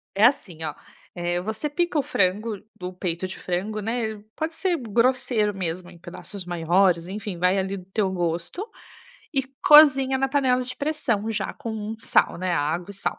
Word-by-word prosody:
É 205 Hz, -, +4 dB
assim 185 Hz, -, +2 dB
ó: 155 Hz, -2 st, -3 dB, 0.4 s
eh, 175 Hz, 0 st, -1 dB
você 220 Hz, +10 st, -3 dB
pica 345 Hz, 0 st, 0 dB
o -, -, +3 dB
frango, 205 Hz, 0 st, 0 dB, 0.2 s
do 180 Hz, 0 st, -6 dB
peito 180 Hz, 0 st, -2 dB
de 190 Hz, -, -8 dB
frango, 195 Hz, +4 st, -2 dB
né, 220 Hz, 0 st, -2 dB, 0.2 s
pode 320 Hz, +1 st, -2 dB
ser 355 Hz, +1 st, 0 dB
grosseiro 235 Hz, -3 st, +1 dB
mesmo 180 Hz, -1 st, -3 dB
em 175 Hz, -, -15 dB
pedaços 185 Hz, +3 st, -8 dB
maiores, 175 Hz, 0 st, +2 dB
enfim, 200 Hz, -2 st, -5 dB
vai 180 Hz, +2 st, +3 dB
ali 195 Hz, +1 st, -1 dB
do 180 Hz, -, -11 dB
teu 195 Hz, 0 st, 0 dB
gosto 175 Hz, -, -3 dB, 0.6 s
e 270 Hz, -2 st, +2 dB, 0.2 s
cozinha 275 Hz, -3 st, +7 dB
na 270 Hz, 0 st, +1 dB
panela 260 Hz, -3 st, +2 dB
de 255 Hz, +1 st, -6 dB
pressão 235 Hz, -8 st, -1 dB
já 215 Hz, -3 st, -2 dB
com 240 Hz, -6 st, -6 dB
um 220 Hz, 0 st, -4 dB
sal, -, -, +2 dB
né, 185 Hz, 0 st, -1 dB
água 170 Hz, +4 st, -1 dB
e -, -, -9 dB
sal. 195 Hz, -, -3 dB
205 Hz, 180 wpm, -24 LUFS, 180-250 Hz, 0.6 s, cozinha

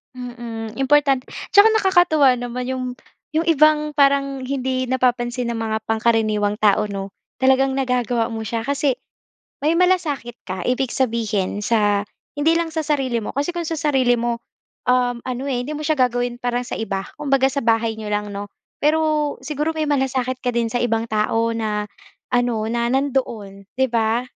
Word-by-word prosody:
Mm, 235 Hz, -3 st, -7 dB
important 270 Hz, -1 st, +3 dB, 0.2 s
tsaka 435 Hz, +2 st, +6 dB
nakakatuwa 350 Hz, -, +4 dB
naman 245 Hz, +1 st, -4 dB
'yong 260 Hz, -1 st, -2 dB, 0.5 s
'yong 325 Hz, +2 st, +1 dB
ibang, 300 Hz, -1 st, +3 dB
parang 275 Hz, -1 st, +2 dB
hindi 260 Hz, -1 st, -1 dB
napapansin 245 Hz, -1 st, 0 dB
ng 235 Hz, -, -2 dB
mga 220 Hz, -1 st, -1 dB
pangkaraniwang 220 Hz, -2 st, +2 dB
tao, 210 Hz, 0 st, +4 dB
'no? 195 Hz, -1 st, -5 dB, 0.3 s
Talagang 265 Hz, 0 st, +4 dB
nagagawa 250 Hz, -3 st, 0 dB
mo 225 Hz, -1 st, -5 dB
siya. 225 Hz, +2 st, -2 dB
Kasi 280 Hz, +1 st, 0 dB, 0.7 s
may 315 Hz, -, +4 dB
malasakit 335 Hz, -9 st, +1 dB
ka, 185 Hz, -1 st, -4 dB
ibig 255 Hz, 0 st, 0 dB
sabihin 215 Hz, -5 st, -1 dB
sa 205 Hz, -3 st, +2 dB, 0.3 s
hindi 315 Hz, +3 st, +3 dB
lang 330 Hz, 0 st, 0 dB
sa 320 Hz, -1 st, -3 dB
sarili 270 Hz, -5 st, 0 dB
mo. 220 Hz, -, -4 dB
Kasi 285 Hz, +5 st, -1 dB
kung 345 Hz, -1 st, -3 dB
sa 325 Hz, -, -2 dB
sarili 270 Hz, -5 st, +2 dB
mo, 235 Hz, 0 st, -1 dB, 0.5 s
um, 250 Hz, -1 st, +2 dB
ano 255 Hz, +2 st, -3 dB
eh, 245 Hz, -1 st, -1 dB
hindi 300 Hz, -, -4 dB
mo 300 Hz, -, -5 dB
siya 305 Hz, 0 st, 0 dB
gagawin, 245 Hz, -1 st, +1 dB
parang 245 Hz, 0 st, -1 dB
sa 250 Hz, -, -5 dB
iba. 195 Hz, -3 st, -2 dB, 0.2 s
Kumbaga 275 Hz, -2 st, +2 dB
sa 275 Hz, -3 st, -3 dB
bahay 225 Hz, -1 st, +2 dB
n'yo 220 Hz, -, -7 dB
lang 205 Hz, 0 st, -1 dB
'no? 200 Hz, 0 st, -5 dB, 0.3 s
Pero 310 Hz, +2 st, +2 dB, 0.4 s
siguro 300 Hz, +3 st, -2 dB
may 310 Hz, -1 st, -2 dB
malasakit 260 Hz, -2 st, 0 dB
ka 250 Hz, -1 st, -2 dB
din 235 Hz, -1 st, 0 dB
sa 245 Hz, -, -1 dB
ibang 230 Hz, -1 st, 0 dB
tao 220 Hz, +2 st, +1 dB
na, 215 Hz, -2 st, -2 dB, 0.4 s
ano, 245 Hz, -3 st, +1 dB
na 235 Hz, 0 st, 0 dB
nandoon, 235 Hz, -8 st, -2 dB
'di 265 Hz, +1 st, +1 dB
ba? 230 Hz, 0 st, +1 dB
250 Hz, 170 wpm, -21 LUFS, 225-280 Hz, 0.7 s, tsaka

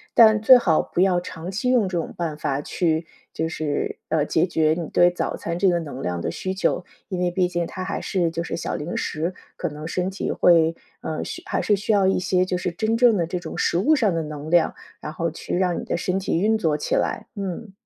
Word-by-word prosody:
但 220 Hz, -2 st, +7 dB
最 255 Hz, +4 st, +9 dB
好 170 Hz, -10 st, +2 dB
不 175 Hz, -, -2 dB
要 185 Hz, -2 st, +3 dB
长 175 Hz, 0 st, -7 dB
期 220 Hz, +6 st, -1 dB
用 245 Hz, -6 st, +3 dB
这 185 Hz, -1 st, -2 dB
种 165 Hz, -, -5 dB
办 165 Hz, -3 st, -2 dB
法 140 Hz, -2 st, -1 dB
去， 160 Hz, +1 st, 0 dB, 0.3 s
就 160 Hz, -, -1 dB
是， 155 Hz, -2 st, -2 dB
呃， 155 Hz, -2 st, +2 dB
解 160 Hz, +2 st, +2 dB
决 160 Hz, -3 st, +2 dB
你 170 Hz, -3 st, -4 dB
对 175 Hz, -, +5 dB
早 180 Hz, -, -3 dB
餐 170 Hz, 0 st, -4 dB
这 190 Hz, +2 st, +3 dB
个 175 Hz, -1 st, +2 dB
能 145 Hz, -5 st, -7 dB
量 90 Hz, -5 st, -2 dB
的 -, -, -2 dB
需 185 Hz, -, -3 dB
求。 190 Hz, -1 st, 0 dB, 0.2 s
因 185 Hz, -, -4 dB
为 180 Hz, -1 st, +1 dB
毕 180 Hz, 0 st, +1 dB
竟 175 Hz, -1 st, -2 dB
它 185 Hz, -, -7 dB
还 200 Hz, -, -3 dB
是 180 Hz, -4 st, 0 dB
就 165 Hz, +1 st, -3 dB
是 -, -, -4 dB
小 170 Hz, -, -3 dB
零 155 Hz, +4 st, -4 dB
食， 165 Hz, +4 st, -2 dB, 0.2 s
可 -, -, -3 dB
能 150 Hz, +1 st, -7 dB
身 180 Hz, +2 st, -1 dB
体 195 Hz, -, -4 dB
会， 165 Hz, -2 st, +4 dB, 0.2 s
嗯， 155 Hz, -, -4 dB
需 -, -, -6 dB
还 -, -, -1 dB
是 205 Hz, -, +2 dB
需 210 Hz, +3 st, 0 dB
要 200 Hz, -2 st, +4 dB
一 190 Hz, -, +2 dB
些 185 Hz, 0 st, +2 dB
就 185 Hz, 0 st, -1 dB
是 180 Hz, 0 st, -2 dB
真 220 Hz, +5 st, 0 dB
正 240 Hz, -2 st, +5 dB
的 175 Hz, -4 st, +1 dB
这 175 Hz, +2 st, -3 dB
种 -, -, -7 dB
食 -, -, +1 dB
物 295 Hz, -, +4 dB
上 220 Hz, -, +2 dB
的 165 Hz, -, 0 dB
能 150 Hz, 0 st, -7 dB
量， 175 Hz, -2 st, +3 dB, 0.2 s
然 150 Hz, -, -6 dB
后 165 Hz, +1 st, -2 dB
去 165 Hz, -, -5 dB
让 180 Hz, -1 st, +1 dB
你 -, -, -6 dB
的 -, -, -1 dB
身 180 Hz, +2 st, -1 dB
体 190 Hz, -, -1 dB
运 220 Hz, +2 st, +3 dB
作 160 Hz, -8 st, +1 dB
起 150 Hz, -, -3 dB
来， -, -, 0 dB
嗯。 195 Hz, +2 st, -5 dB
175 Hz, 270 characters per minute, -23 LUFS, 160-190 Hz, 0.3 s, 最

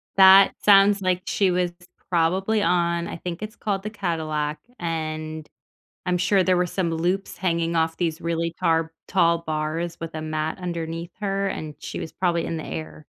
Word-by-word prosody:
That 195 Hz, 0 st, +8 dB
sounds 200 Hz, 0 st, +6 dB
like 185 Hz, -1 st, +1 dB
she 195 Hz, -3 st, +2 dB
was 180 Hz, 0 st, +1 dB, 0.4 s
probably 190 Hz, +5 st, +2 dB
on- 170 Hz, 0 st, +1 dB
I -, -, -6 dB
think 170 Hz, +1 st, -6 dB
it's 215 Hz, +2 st, -7 dB
called 195 Hz, -3 st, -2 dB
the 215 Hz, -, -3 dB
Cadillac, 160 Hz, -7 st, -2 dB, 0.2 s
and 155 Hz, -2 st, -4 dB, 0.6 s
I'm 180 Hz, -1 st, +1 dB
sure 185 Hz, +2 st, +3 dB
there 185 Hz, 0 st, +3 dB
were 180 Hz, -, +2 dB
some 175 Hz, -1 st, -1 dB
loops 175 Hz, +4 st, -1 dB
hanging 170 Hz, -2 st, 0 dB
off 160 Hz, 0 st, +1 dB
these 165 Hz, -3 st, -1 dB
really 170 Hz, 0 st, -1 dB
tar 165 Hz, 0 st, +1 dB, 0.2 s
tall 170 Hz, -3 st, +3 dB
bars 160 Hz, +1 st, -3 dB
with 165 Hz, -1 st, -6 dB
a 155 Hz, -, -4 dB
mat 155 Hz, 0 st, -2 dB
underneath 170 Hz, -1 st, -4 dB
her, 195 Hz, -1 st, -1 dB
and 155 Hz, -5 st, -5 dB
she -, -, -6 dB
was 160 Hz, -, -6 dB
probably 170 Hz, -2 st, 0 dB
in 165 Hz, -, -3 dB
the 160 Hz, -, -5 dB
air. 80 Hz, 0 st, -7 dB
170 Hz, 175 wpm, -24 LUFS, 160-185 Hz, 0.6 s, That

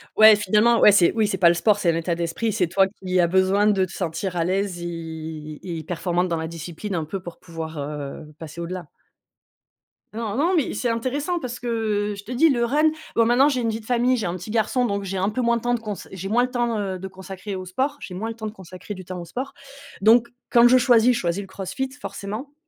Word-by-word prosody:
Ouais 215 Hz, 0 st, +9 dB
finalement, 210 Hz, +4 st, +3 dB
ouais, 210 Hz, -, +8 dB
c'est 185 Hz, -4 st, +5 dB
oui 220 Hz, -2 st, +2 dB
c'est 195 Hz, -2 st, -1 dB
pas 175 Hz, -2 st, +6 dB
le -, -, +4 dB
sport, 205 Hz, +4 st, +3 dB
c'est 175 Hz, -4 st, +2 dB
un -, -, -2 dB
état 170 Hz, +1 st, -1 dB
d'esprit, 170 Hz, +7 st, -2 dB
c'est 190 Hz, -4 st, +1 dB
toi 190 Hz, +2 st, +3 dB
qui 185 Hz, -2 st, -2 dB
a 175 Hz, -, +4 dB
besoin 190 Hz, +3 st, +3 dB
de 195 Hz, -3 st, +3 dB
te -, -, -13 dB
sentir 180 Hz, +1 st, -3 dB
à 165 Hz, -, +1 dB
l'aise 185 Hz, -1 st, -1 dB
et 160 Hz, -3 st, -6 dB, 0.2 s
et -, -, -8 dB
performante 175 Hz, +2 st, -1 dB
dans 170 Hz, -2 st, -1 dB
la 160 Hz, 0 st, -3 dB
discipline, 170 Hz, +4 st, -6 dB
un 160 Hz, -3 st, -1 dB
peu 195 Hz, +5 st, -4 dB
pour 175 Hz, -2 st, -10 dB
pouvoir, 165 Hz, -2 st, -7 dB
heu, 150 Hz, +1 st, -6 dB
passer 160 Hz, +1 st, -9 dB
au-delà. 175 Hz, -1 st, -5 dB, 1.3 s
Non, 220 Hz, -1 st, -3 dB
non, 345 Hz, +6 st, +2 dB
mais 310 Hz, -, +1 dB
c'est 245 Hz, -, -2 dB
intéressant 275 Hz, +9 st, -1 dB
parce 250 Hz, -5 st, -5 dB
que, 245 Hz, -, -6 dB, 0.4 s
heu, -, -, -4 dB
je 200 Hz, -, -10 dB
te 230 Hz, -, -9 dB
dis 295 Hz, +7 st, +4 dB
le 240 Hz, -3 st, +2 dB
run 300 Hz, +6 st, +3 dB, 0.2 s
bon 230 Hz, -, +4 dB
maintenant 250 Hz, +5 st, +5 dB
j'ai 260 Hz, -, 0 dB
une 230 Hz, -2 st, 0 dB
vie 220 Hz, 0 st, -3 dB
de -, -, -18 dB
famille, 245 Hz, +1 st, +2 dB
j'ai 225 Hz, -, -2 dB
1 175 Hz, 0 st, -2 dB
petit 180 Hz, +4 st, -8 dB
garçon 235 Hz, +3 st, +1 dB
donc 200 Hz, -2 st, -1 dB
j'ai 195 Hz, 0 st, -4 dB
un 190 Hz, -, +1 dB
peu 250 Hz, +4 st, -2 dB
moins 235 Hz, 0 st, +2 dB
de 230 Hz, -, -6 dB
temps 245 Hz, 0 st, 0 dB
de 240 Hz, -, 0 dB
cons 210 Hz, -2 st, -4 dB, 0.2 s
j'ai 190 Hz, +1 st, -5 dB
moins 240 Hz, +3 st, +3 dB
le 250 Hz, -, -1 dB
temps, 240 Hz, -3 st, -1 dB
heu, 190 Hz, -2 st, -3 dB
de 190 Hz, -, -6 dB
consacrer 190 Hz, +1 st, -7 dB
au 185 Hz, -, -6 dB
sport, 265 Hz, +10 st, -1 dB
j'ai 185 Hz, -, -8 dB
moins 220 Hz, +5 st, -4 dB
le 225 Hz, -, -6 dB
temps 220 Hz, -, -7 dB
de -, -, -5 dB
consacrer 185 Hz, +1 st, -9 dB
du 185 Hz, -1 st, -9 dB
temps 185 Hz, 0 st, -7 dB
au 170 Hz, -, -7 dB
sport, 255 Hz, +11 st, -5 dB, 0.5 s
donc 230 Hz, +3 st, +5 dB, 0.2 s
quand 235 Hz, -1 st, +6 dB
je 255 Hz, -, +7 dB
choisis, 245 Hz, -1 st, +5 dB
je 240 Hz, -, -1 dB
choisis 175 Hz, +1 st, -1 dB
le 195 Hz, -, -9 dB
CrossFit 200 Hz, +8 st, -4 dB
forcément, 220 Hz, +9 st, -6 dB
200 Hz, 255 wpm, -23 LUFS, 175-235 Hz, 1.3 s, Ouais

